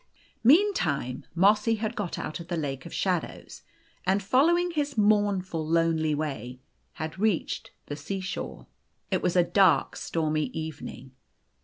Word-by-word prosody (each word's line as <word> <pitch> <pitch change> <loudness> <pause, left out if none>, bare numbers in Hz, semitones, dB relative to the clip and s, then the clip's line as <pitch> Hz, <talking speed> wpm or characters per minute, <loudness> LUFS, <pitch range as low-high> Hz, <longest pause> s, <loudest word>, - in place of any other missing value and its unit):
O - - -36 0.4
Meantime 240 - +3
Mossy 210 +5 +4
had 220 +1 -3
got 205 -7 -3
out 155 - -4
of 170 - -9
the 175 - -2
lake 135 -2 -4
of - - -11
shadows, 180 -4 -2 0.4
and, 195 +2 +1
following 340 - +3
his 290 -5 -2
mournful, 205 -5 +2
lonely 160 -1 +2
way, 130 -5 -4 0.3
had 155 +3 -6
reached 210 -5 0 0.2
the 145 - -5
sea 175 +7 -4
shore. 190 0 -5 0.5
It - - +1
was 180 0 0
a 175 - +6
dark, 185 +3 +3
stormy 155 -2 -1
evening. 145 -4 -7
180 Hz, 145 wpm, -27 LUFS, 155-210 Hz, 0.5 s, a